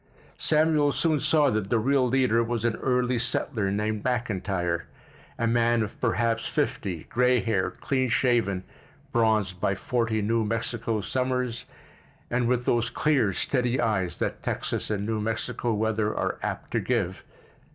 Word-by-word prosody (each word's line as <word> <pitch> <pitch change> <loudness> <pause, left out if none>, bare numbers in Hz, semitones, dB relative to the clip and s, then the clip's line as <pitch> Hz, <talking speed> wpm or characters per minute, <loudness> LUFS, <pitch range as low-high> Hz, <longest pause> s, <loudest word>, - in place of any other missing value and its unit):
Samuel 155 -2 +3
soon 160 -3 +1
saw 150 -1 +3
that 105 -2 -1
the 120 - +3
real 130 +3 +2
leader 125 -2 +3
was 115 -1 -2
an 115 -2 +1
early 125 -1 +1
settler 115 -3 0
named 105 +1 -1
McIntyre, 95 -8 -1 0.5
a 115 - 0
man 115 0 +3
of 105 - -8
perhaps 115 -1 +1
fifty, 85 -5 -2
gray 125 +1 +2
haired, 110 -6 -1
clean 130 -2 0
shaven, 115 -7 +1 0.5
bronzed 110 -6 +1
by 100 - +1
forty 115 +1 -1
New 115 +2 +1
Mexico 115 0 -2
summers, 125 0 -1 0.7
and 120 0 +1
with 125 0 +1
those 120 0 +2
clear 135 -10 +2
steady 125 +6 0
eye 105 -6 +1
that - - -2
Texas - - -2
and 100 -1 -1
New 110 0 -1
Mexico 115 +2 -2
weather 110 0 0
are - - -1
apt - - -4
to - - +1
give. - - -1
115 Hz, 150 wpm, -26 LUFS, 105-125 Hz, 0.7 s, Samuel